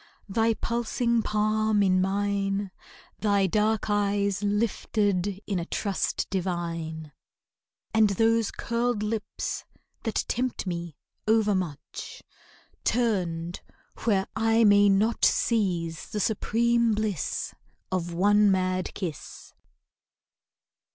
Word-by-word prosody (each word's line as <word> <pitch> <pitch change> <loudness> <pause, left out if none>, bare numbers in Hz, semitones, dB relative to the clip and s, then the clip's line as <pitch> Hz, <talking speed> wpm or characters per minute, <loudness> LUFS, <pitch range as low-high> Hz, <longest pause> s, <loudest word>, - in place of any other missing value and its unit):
Thy 225 +2 +2
pulsing 235 0 0
palm 215 0 +1
in 185 -1 +3
mine, 200 0 0 0.5
Thy 200 -2 +2
dark 215 +3 +1
eyes 200 -1 +1
lifted 205 -2 0
in 195 -3 -1
a 170 - -3
trust 200 +1 -1
divine, 170 -4 -3 0.8
And 220 -1 +5
those 225 +2 +2
curled 235 -2 -1
lips 215 0 -3 0.4
that 225 - -1
tempt 250 -2 -2
me 170 -4 -4 0.3
overmuch 200 -8 -1 0.6
Turned 180 -8 0 0.4
where 195 -4 +2
I 225 +1 +3
may 205 -1 +6
not 210 +4 +2
seize 175 -8 +1
the 210 - -3
supreme 230 +2 +2
bliss 210 -7 -2 0.4
Of 175 -2 -1
one 205 +4 +4
mad 185 -1 0
kiss. 170 -7 -7
205 Hz, 95 wpm, -27 LUFS, 185-220 Hz, 0.8 s, may